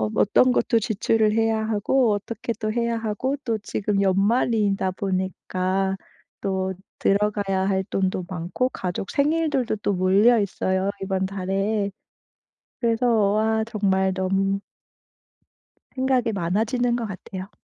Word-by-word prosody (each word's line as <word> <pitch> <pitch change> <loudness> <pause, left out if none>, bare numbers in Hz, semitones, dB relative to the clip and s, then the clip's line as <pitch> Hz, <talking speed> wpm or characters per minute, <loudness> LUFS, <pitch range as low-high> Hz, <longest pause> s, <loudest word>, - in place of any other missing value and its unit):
어떤 250 +5 +4
것 - - +1
또 230 - +3
지출을 220 0 +1
해야 225 0 +2
하고 225 +2 +2
어떻게 220 +3 -4
또 215 0 -1
해야 235 -1 0
하고 230 +5 -2
또 230 -2 0
지금 205 -1 -1
연말이다 200 0 +2
보니까 190 0 -1 0.5
또 190 -1 -1 0.3
들어가야 200 -1 +1
할 190 -1 0
돈도 185 -2 -1
많고 180 +7 -2
가족 185 -4 -4
생일들도 290 -5 +1
또 205 0 -1
몰려있어요 190 -1 +2
이번 190 0 -1
달에. 195 +2 -1 0.9
그래서 235 +1 +1 0.3
와 220 +1 +1
정말 190 -4 +1
너무 195 +1 0 1.4
생각이 260 -3 +1
많아지는 220 +7 0
것 235 -2 -2
같아요. 190 0 -7
205 Hz, 250 characters per minute, -24 LUFS, 190-230 Hz, 1.4 s, 어떤